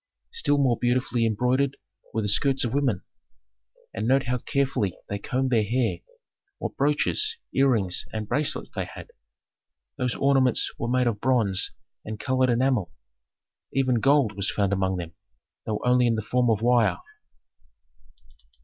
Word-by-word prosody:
Still 145 0 +2
more 130 -5 +2
beautifully 120 -1 +1
embroidered 125 +5 +1 0.3
were 110 - -1
the - - -1
skirts 135 +6 +1
of 115 - -3
women. 135 -9 0 0.9
And 110 +2 -3
note 135 +1 +3
how 125 0 -1
carefully 130 -9 -1
they 100 - -3
combed 130 +5 -1
their 115 -3 +3
hair, 120 +3 0 0.6
what - - -5
brooches, 150 - +1 0.2
earrings, 115 -10 +2
and 110 -1 -4
bracelets 145 +6 0
they - - -3
had. - - -11 0.9
Those 125 -1 -1
ornaments 135 -3 +2
were 115 - -2
made 125 0 +2
of 110 -4 -1
bronze 115 -7 +1 0.3
and 110 0 -6
colored 130 -1 +1
enamel; 120 -7 +1 0.8
even 130 -3 +2
gold 135 -5 +3
was 100 0 0
found 100 -1 0
among 95 -1 0
them, 85 -2 -6 0.5
though 105 -1 -1
only 125 0 +4
in 115 - +2
the 110 - -3
form 125 +3 +1
of 110 -1 +1
wire. 115 -7 +3
125 Hz, 150 wpm, -25 LUFS, 105-130 Hz, 0.9 s, only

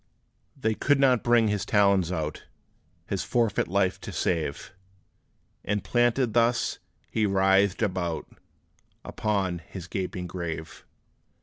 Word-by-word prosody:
They 110 0 +1
could 140 +5 +2
not 130 -4 +4
bring 120 -2 +4
his 105 -2 0
talons 100 -4 +3
out, 75 -3 -4 0.6
His 95 0 -2
forfeit 110 +3 +1
life 95 0 0
to - - -7
save; 80 -5 -2 0.9
And 100 -1 -1
planted 120 +2 +2
thus, 120 +1 +2 0.3
he 110 -1 +1
writhed 95 +1 +3
about 90 -5 -2 0.8
Upon 95 -5 -1
his 85 +1 -9
gaping 90 0 -4
grave. 85 -3 -6
100 Hz, 115 wpm, -27 LUFS, 90-110 Hz, 0.9 s, not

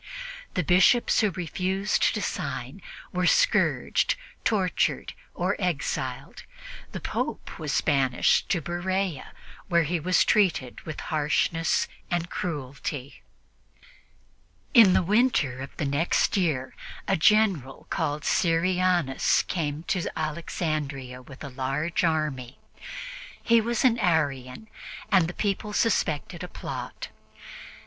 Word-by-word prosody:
The 180 - +1
Bishops 185 - +4
who 215 - +3
refused 190 +2 0
to - - -2
sign - - -4 0.3
were 180 0 +1
scourged, - - +2 0.3
tortured 195 -5 0 0.2
or - - 0
exiled; - - -3 0.5
the - - -5
Pope - - -4
was - - 0
banished 135 -4 +2
to 175 - +1
Berea, 175 0 -2 0.4
where 170 -2 +3
he 170 +3 -1
was 180 +4 +3
treated 170 - +1
with 155 - -5
harshness 155 +2 +1 0.2
and 175 0 -2
cruelty. 140 -3 -5 1.5
In 225 -7 +8
the - - +3
winter 205 - +2
of 135 - -9
the 150 - -1
next 140 +5 +1
year, 155 -9 0 0.3
a 195 - +3
General 180 - +2
called 150 +1 -1
Syrianus 175 -4 +2
came 155 -3 -3
to 180 0 -1
Alexandria 150 -5 -3
with 135 +3 -12
a 140 - -6
large 135 +7 -2
army. 150 -6 -1 0.9
He 230 -1 +5
was 235 +2 0
an 240 -2 +4
Arian, 145 - 0 0.4
and 185 -5 +5
the 175 - -6
people 210 0 -2
suspected 185 -9 0
a - - -5
plot. - - -7
170 Hz, 115 wpm, -26 LUFS, 145-190 Hz, 1.5 s, In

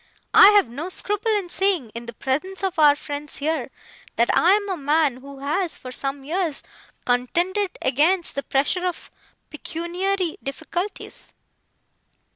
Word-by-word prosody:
'I - - +10
have 410 -9 +5
no 285 +10 -6
scruple 415 +4 -1
in 400 -4 -1
saying, 360 - +1
in 235 0 -7
the 235 - -7
presence 310 - -3
of 375 -4 -1
our 295 -2 +7
friends 290 0 -6
here, 295 -3 -2 0.5
that 235 - +2
I 360 +3 +5
am 410 0 +1
a 380 - -1
man 295 -3 +1
who 275 +1 -12
has, 335 +5 -1
for 255 - -9
some 275 +2 -3
years, 325 0 -2 0.4
contended 345 +11 0
against 320 +7 +2
the 280 - -2
pressure 290 +8 0
of 355 - -6 0.4
pecuniary 350 +4 -2
difficulties. 345 +8 -6
320 Hz, 145 wpm, -23 LUFS, 275-375 Hz, 0.5 s, I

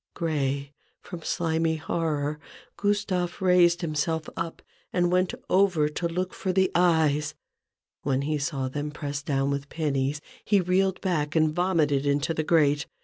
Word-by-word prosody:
Gray 140 -4 -1 0.3
from 175 -3 -9
slimy 160 -1 0
horror, 155 -2 -2 0.4
Gustave 200 -4 0
raised 180 -1 +4
him 165 -3 -2
self 160 +1 -1
up, 165 0 -5 0.3
and 175 -1 +1
went 185 0 +2 0.2
over 180 -5 +3
to 170 +3 -2
look 180 +2 -3
for 190 - -2
the 190 0 +2
eyes. 155 -4 +2 0.7
When 135 -1 0
he 150 +1 -1
saw 140 -2 -2
them 145 +3 -3
pressed 145 -1 -5
down 140 -1 +1
with 140 0 -3
pennies, 145 -2 -1 0.2
he 205 -2 +3
reeled 185 +1 +1
back 155 -5 -1
and 155 -1 +3
vomited 155 -6 +1
into 145 +3 +1
the 160 - -1
grate. 150 -2 +2
160 Hz, 150 wpm, -26 LUFS, 145-175 Hz, 0.7 s, raised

